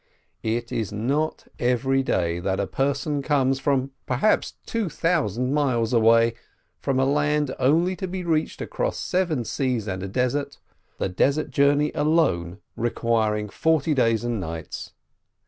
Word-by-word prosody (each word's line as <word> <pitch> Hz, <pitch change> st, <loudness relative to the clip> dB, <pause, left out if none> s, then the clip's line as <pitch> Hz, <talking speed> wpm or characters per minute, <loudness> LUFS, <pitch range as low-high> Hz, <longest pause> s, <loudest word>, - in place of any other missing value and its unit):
It 115 Hz, +1 st, -2 dB
is 110 Hz, -4 st, -2 dB
not 135 Hz, +9 st, -1 dB
every 130 Hz, +2 st, +2 dB
day 85 Hz, -9 st, 0 dB
that 95 Hz, +2 st, -1 dB
a -, -, +1 dB
person 140 Hz, +2 st, -1 dB
comes 135 Hz, -2 st, +1 dB
from 135 Hz, -1 st, 0 dB, 0.2 s
perhaps 130 Hz, +12 st, +1 dB
two 225 Hz, -5 st, -2 dB
thousand 125 Hz, -, 0 dB
miles 125 Hz, -6 st, +1 dB
away, 115 Hz, 0 st, +5 dB, 0.5 s
from 135 Hz, -1 st, 0 dB
a 135 Hz, -, +3 dB
land 150 Hz, 0 st, +1 dB
only 165 Hz, +8 st, +3 dB
to 190 Hz, -, -3 dB
be 185 Hz, 0 st, -4 dB
reached 160 Hz, -2 st, -1 dB
across -, -, -2 dB
seven 170 Hz, -9 st, 0 dB
seas 125 Hz, -2 st, -1 dB
and 95 Hz, -1 st, -3 dB
a 95 Hz, -, -4 dB
desert, 130 Hz, +6 st, -1 dB, 0.4 s
the -, -, -1 dB
desert 140 Hz, +10 st, +1 dB
journey 145 Hz, +2 st, +3 dB
alone 105 Hz, -, +1 dB
requiring 110 Hz, -2 st, 0 dB
forty 160 Hz, +6 st, +1 dB
days 115 Hz, -4 st, +2 dB
and 120 Hz, -2 st, -1 dB
nights. 80 Hz, -2 st, -6 dB
130 Hz, 145 wpm, -24 LUFS, 115-150 Hz, 0.5 s, away